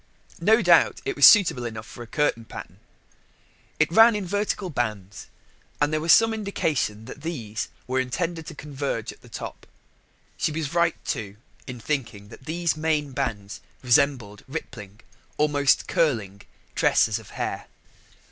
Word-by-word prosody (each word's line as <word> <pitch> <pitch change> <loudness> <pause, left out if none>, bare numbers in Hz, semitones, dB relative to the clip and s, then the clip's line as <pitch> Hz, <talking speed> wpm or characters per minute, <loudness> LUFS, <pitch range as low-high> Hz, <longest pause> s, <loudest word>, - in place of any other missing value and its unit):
No 220 +6 +4
doubt 175 -2 +4
it 405 -1 -2
was - - +9
suitable 185 - +5
enough 110 -2 -6
for 120 - -11
a 120 - -8
curtain 130 -3 0
pattern: - - -10 1.0
it 155 +1 +2
ran 225 +4 +7
in 205 -2 -3
vertical 205 -1 -2
bands, 105 -6 -4 0.5
and 145 +1 +1
there 155 - 0
was 165 +1 +3
some 225 +7 +6
indication 155 - -2
that 145 - -10
these 120 -10 -4 0.2
were 130 +1 -1
intended 165 +6 -3
to - - -8
converge 140 -6 -4
at - - -23
the - - -17
top. - - -8 0.7
She - - 0
was 155 -1 -4
right, 170 -1 +2
too, 105 -7 -4 0.3
in 125 -2 -7
thinking 115 -6 -4
that 130 - -14
these 170 +1 -1
main 155 -2 -1
bands 110 -7 -4 0.2
resembled 125 -5 +1
rippling 110 -8 -8 0.4
almost 145 -2 +2
curling 110 - 0 0.3
tresses 110 +1 +2
of 110 - -15
hair. - - -4
140 Hz, 150 wpm, -24 LUFS, 115-165 Hz, 1.0 s, was